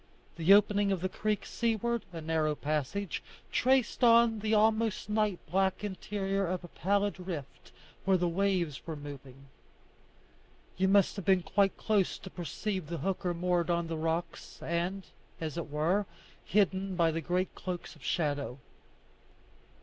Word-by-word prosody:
The 170 Hz, +2 st, +2 dB
opening 205 Hz, 0 st, +5 dB
of 190 Hz, -3 st, 0 dB
the 185 Hz, -, -1 dB
creek 210 Hz, +2 st, -1 dB
seaward, 235 Hz, 0 st, -1 dB
a 165 Hz, -2 st, -6 dB
narrow 155 Hz, -1 st, 0 dB
passage, 155 Hz, +6 st, -2 dB, 0.3 s
traced 255 Hz, -1 st, +2 dB
on 230 Hz, -1 st, +6 dB
the 215 Hz, +1 st, -2 dB
almost 220 Hz, 0 st, +2 dB
night 210 Hz, -3 st, +1 dB
black 190 Hz, +2 st, +1 dB
interior 195 Hz, -1 st, -2 dB
a 185 Hz, +2 st, 0 dB
pallid 195 Hz, +3 st, -1 dB
rift 145 Hz, -8 st, -7 dB, 0.3 s
where 190 Hz, 0 st, +4 dB
the 175 Hz, 0 st, +1 dB
waves 175 Hz, -4 st, 0 dB
were 160 Hz, -, -3 dB
moving. 140 Hz, -2 st, -10 dB, 1.3 s
You 190 Hz, +1 st, +2 dB
must 200 Hz, +1 st, +4 dB
have 200 Hz, -, -5 dB
been 190 Hz, -2 st, +4 dB
quite 195 Hz, +3 st, +2 dB
close 205 Hz, -4 st, +1 dB
to 190 Hz, -, -10 dB
perceive 185 Hz, +1 st, -4 dB
the 170 Hz, +1 st, -4 dB
hooker 185 Hz, -2 st, -1 dB
moored 175 Hz, 0 st, +1 dB
to 170 Hz, -1 st, +1 dB
the 165 Hz, 0 st, -4 dB
rocks, 165 Hz, +2 st, -3 dB
and, 175 Hz, +3 st, -2 dB, 0.3 s
as 160 Hz, -2 st, -4 dB
it 170 Hz, -3 st, -4 dB
were, 170 Hz, +7 st, +1 dB, 0.4 s
hidden 195 Hz, -1 st, +1 dB
by 165 Hz, -2 st, +3 dB
the 165 Hz, +1 st, -2 dB
great 180 Hz, +4 st, -1 dB
cloaks 180 Hz, -2 st, -6 dB
of -, -, -18 dB
shadow. 145 Hz, -6 st, -1 dB
185 Hz, 150 wpm, -31 LUFS, 165-205 Hz, 1.3 s, on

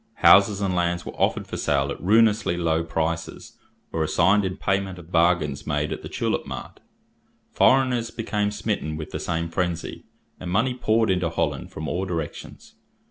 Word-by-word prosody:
Houses 100 Hz, +1 st, +6 dB
and 95 Hz, -2 st, 0 dB
lands 85 Hz, 0 st, 0 dB
were -, -, -5 dB
offered -, -, 0 dB
for -, -, -6 dB
sale 70 Hz, -1 st, 0 dB
at -, -, -7 dB
ruinously 105 Hz, -1 st, +3 dB
low 80 Hz, -1 st, +1 dB
prices, 85 Hz, 0 st, -4 dB, 0.3 s
or 80 Hz, -, -1 dB
assigned 95 Hz, +6 st, +3 dB
in 95 Hz, 0 st, -3 dB
payment 95 Hz, -1 st, -1 dB
of 85 Hz, -1 st, -13 dB
bargains 80 Hz, -5 st, +1 dB
made 75 Hz, 0 st, -1 dB
at -, -, -7 dB
the -, -, -8 dB
tulip -, -, -2 dB
mart. -, -, -8 dB, 0.7 s
Foreigners 130 Hz, -3 st, +3 dB
became 105 Hz, -2 st, -2 dB
smitten 105 Hz, -7 st, -3 dB
with 75 Hz, -, -7 dB
the -, -, -4 dB
same 85 Hz, 0 st, -2 dB
frenzy, 85 Hz, 0 st, -3 dB, 0.3 s
and 90 Hz, -, -6 dB
money 110 Hz, +8 st, +1 dB
poured 110 Hz, -3 st, +1 dB
into 90 Hz, -2 st, 0 dB
Holland 85 Hz, -, -2 dB
from 80 Hz, -, -6 dB
all 90 Hz, +2 st, -2 dB
directions. 80 Hz, -5 st, -6 dB
90 Hz, 170 wpm, -24 LUFS, 80-105 Hz, 0.7 s, Houses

